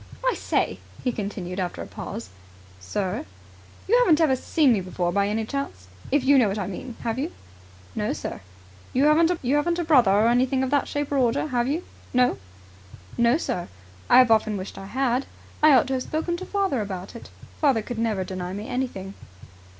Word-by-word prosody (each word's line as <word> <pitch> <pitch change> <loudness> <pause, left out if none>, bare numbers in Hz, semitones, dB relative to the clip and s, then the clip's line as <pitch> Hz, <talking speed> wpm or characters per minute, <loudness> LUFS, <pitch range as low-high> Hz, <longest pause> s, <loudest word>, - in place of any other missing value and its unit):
"I - - +3
say!" - - -1 0.2
he 250 - +1
continued, 195 -4 -5
after 180 -2 -3
a - - -8
pause. 95 - -7 0.5
"Sir?" 180 - -3 0.6
"You 475 +5 +5
haven't 345 -11 +4
ever 305 -5 +4
seen 275 0 +3
me 205 - 0
before 175 -1 -2
by 200 +2 +1
any 220 +2 -1
chance, 220 - -5 0.2
if 285 -1 +2
you 275 +1 +6
know 235 - +4
what 200 +1 -2
I 200 - -2
mean, 225 +6 -7
have 230 +1 -2
you?" 305 +5 -2 0.6
"No, - - -1
sir." - - -5 0.5
"You 260 - +2
haven't 320 0 +2
a 350 - 0
brother, 275 -10 +5
or 210 +3 +4
anything 255 +2 +2
of 260 - -2
that 285 -1 +2
shape 290 0 -3
or 285 - +1
order, 255 +4 +1
have 245 -2 0
you, 310 +6 -1 0.3
no?" 250 - +3 0.8
"No, 235 +4 +3
sir. 180 - -3 0.4
I - - +7
have 255 -2 +6
often 215 -1 +3
wished 190 0 -7
I 195 - -8
had. 255 +3 0 0.3
I 305 0 +7
ought 255 - +5
to 265 - -3
have 260 - 0
spoken 320 +5 -2
to 375 - -7
father 390 - 0
about 195 0 -6
it. 235 - -10 0.3
Father 265 -8 +3
could 235 +1 -5
never 220 -4 0
deny 185 -1 -5
me 205 +2 -6
anything." 195 -7 -3
245 Hz, 195 wpm, -25 LUFS, 200-285 Hz, 0.8 s, I